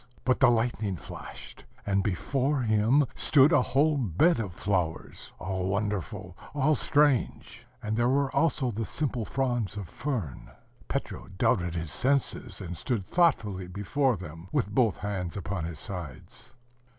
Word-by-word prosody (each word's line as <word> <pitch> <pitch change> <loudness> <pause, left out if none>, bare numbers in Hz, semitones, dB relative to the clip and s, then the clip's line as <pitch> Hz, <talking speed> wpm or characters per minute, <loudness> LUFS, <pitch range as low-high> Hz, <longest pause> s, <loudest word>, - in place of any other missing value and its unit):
But 130 - +2
the 130 - +7
lightning 115 -4 0
flashed; - - -10 0.2
and 100 -1 +2
before 130 - 0
him 115 +5 +3
stood 145 +1 +5
a - - +6
whole 145 +4 +2
bed 125 - +3
of 105 -5 -3
flowers, 90 -3 -2
all 95 0 -3
wonderful, 100 -2 -2 0.2
all 150 +2 +3
strange: 145 -5 +1 0.2
and 105 0 -1
there 120 +2 +2
were 140 0 +1
also 140 -6 +2
the 115 +1 -3
simple 125 -2 -2
fronds 120 -6 -1
of 100 -4 -5
fern. 120 - -4 0.4
Petro - - -4
doubted 90 -1 +1
his 80 -3 -3
senses, 135 - 0
and 90 0 -6
stood 95 - -2
thoughtfully 105 - +1
before 110 +7 0
them, 85 0 -9
with 100 - 0
both 115 -4 +3
hands 100 -2 -3
upon 95 -3 -3
his 85 -2 -6
sides. 85 - -8
110 Hz, 145 wpm, -28 LUFS, 95-135 Hz, 0.4 s, the